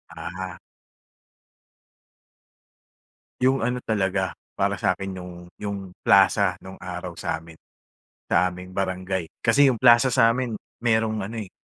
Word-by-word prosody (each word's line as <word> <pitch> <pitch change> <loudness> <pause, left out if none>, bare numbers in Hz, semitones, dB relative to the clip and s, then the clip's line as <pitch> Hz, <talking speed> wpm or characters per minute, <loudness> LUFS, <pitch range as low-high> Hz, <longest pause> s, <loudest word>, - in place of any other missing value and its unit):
Ah. - - -6 2.8
Yung 130 +1 +3
ano 125 +2 0
talaga, 95 -3 0 0.2
para - - +1
sa'kin 95 -1 0
yung 90 -1 -10 0.2
yung 100 -3 -5
plaza 95 -1 +4
nong 95 0 -10
araw 90 -1 -6
sa'min, 80 0 -5 0.8
sa 90 +1 +3
aming 90 +1 -10
barangay. 95 -2 -2 0.2
Kasi 140 +4 +6
yung 120 - -3
Plaza 120 +1 +7
sa'min 115 0 +3 0.3
mayroong 110 -2 +1
ano, 115 +3 -6
eh, 95 - -8
95 Hz, 115 wpm, -24 LUFS, 90-115 Hz, 2.8 s, Plaza